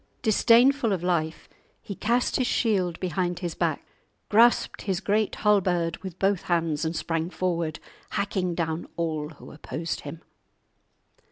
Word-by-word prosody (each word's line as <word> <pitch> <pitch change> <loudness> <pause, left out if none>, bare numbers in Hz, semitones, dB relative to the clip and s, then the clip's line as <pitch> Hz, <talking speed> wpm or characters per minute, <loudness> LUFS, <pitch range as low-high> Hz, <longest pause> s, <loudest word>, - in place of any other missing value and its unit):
Disdainful 235 +2 +4
of 180 -3 -3
life, 165 -3 -1 0.3
he 200 - -7
cast 235 +5 +1
his 255 - +1
shield 185 -7 +1
behind 180 0 -1
his 175 -2 -4
back, - - -1 0.4
grasped 235 +3 +4
his 190 -3 -1
great 215 +1 0
halberd 180 -5 +2
with 185 -3 -8
both 195 -1 +1
hands, 165 -3 0
and 160 +1 -2
sprang 165 +1 -2
forward, 170 -4 -2 0.3
hacking 190 -3 -1
down 160 -1 -2
all 155 -3 -2
who 155 - -13
opposed 160 +2 -5
him. 155 +3 -9
180 Hz, 140 wpm, -26 LUFS, 165-205 Hz, 0.4 s, Disdainful